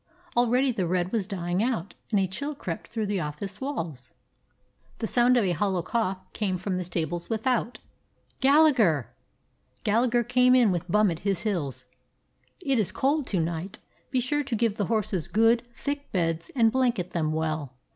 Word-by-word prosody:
Already 245 +2 +3
the 195 -7 -1
red 180 +1 0
was 215 -5 -1
dying 180 -2 -2
out, 225 -6 -1 0.2
and 210 - +2
a 195 - +2
chill 280 +11 -4
crept 185 - -5
through 220 -2 -3
the 200 -1 -1
office 180 +6 -5
walls. 160 - -4 0.9
The 230 - -3
sound 245 +2 +4
of 235 - +3
a 185 - +1
hollow 190 -2 0
cough 195 -1 -1 0.2
came 195 -4 -1
from 185 0 -2
the 180 - -2
stables 170 -1 -3
without. 235 +1 0 0.6
"Gallagher!" 265 - +4 0.7
Gallagher 240 +3 +2
came 250 +1 +4
in 240 -5 +5
with 175 0 -3
Bum 210 +1 +4
at 165 - -4
his 195 -3 -1
heels. 145 - -2 0.8
"It 270 -4 +2
is 210 - 0
cold 285 +1 0
to 190 - 0
night. 170 +4 -3 0.3
Be 255 - +1
sure 260 +4 0
and 265 -5 -2
give 225 -2 +1
the 205 - 0
horses 200 -7 -1
good, 225 +6 +3
thick 285 0 -4
beds, 165 -2 -1
and 225 -3 +4
blanket 240 -8 0
them 155 -3 0
well. 155 -4 -2
205 Hz, 175 wpm, -27 LUFS, 175-240 Hz, 0.9 s, in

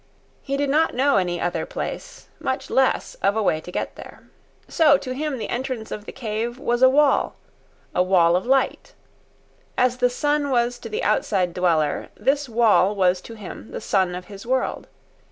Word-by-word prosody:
He 275 -1 -3
did 285 -1 0
not 315 0 +2
know 275 +1 +3
any 175 -2 0
other 175 - -1
place, - - -6
much - - -3
less 265 - +1
of 200 - +2
a 220 - +1
way 155 -5 +1
to 180 - -10
get - - -4
there. - - -12 0.4
So 300 -4 +4
to 255 -2 -5
him 295 0 -3
the 225 - -4
entrance 245 -3 -4
of 210 - -6
the - - -7
cave 235 0 -4
was 240 -3 -1
a 260 - +8
wall—a 280 -8 -1
wall 175 -2 +4
of 180 - 0
light. 270 +1 0 0.8
As 250 0 +2
the 250 0 +3
sun 290 +3 0
was 240 -1 +1
to - - -8
the 440 +3 -3
outside 185 -4 +1
dweller, 165 -5 0
this 280 0 0
wall 220 -3 +3
was 185 -2 +2
to 230 - -10
him 210 0 -9
the - - -6
sun 185 -3 0
of 180 0 -7
his 200 0 -10
world. 255 +2 -1
240 Hz, 185 wpm, -23 LUFS, 190-270 Hz, 0.8 s, a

